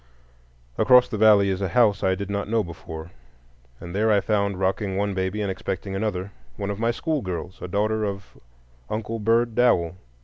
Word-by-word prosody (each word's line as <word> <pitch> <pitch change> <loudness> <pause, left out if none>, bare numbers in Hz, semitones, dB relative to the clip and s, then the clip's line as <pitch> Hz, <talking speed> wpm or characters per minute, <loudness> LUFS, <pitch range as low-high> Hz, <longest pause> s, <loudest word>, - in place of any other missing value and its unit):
Across 125 -1 +6
the 110 - -3
valley 105 -2 +6
is 95 0 -2
a 95 - 0
house 105 +1 +3
I 95 0 +2
did 100 +1 -5
not 100 0 -2
know 115 -1 +2
before, 80 -1 -9 0.7
and 85 0 -8
there 110 +2 +2
I 105 - +5
found, 100 -2 0
rocking 95 +1 -1
one 100 0 0
baby 95 +2 -2
and 100 - -1
expecting 95 +1 -4
another, 95 -2 -2 0.3
one 100 0 -3
of 100 - -5
my 115 +1 +1
schoolgirls, 95 - -3
a - - -5
daughter 110 +4 0
of 100 -2 -5 0.5
Uncle 110 +1 -3
Bird 115 +2 +2
Dowell. 90 -9 +2
100 Hz, 180 wpm, -24 LUFS, 95-110 Hz, 0.7 s, Across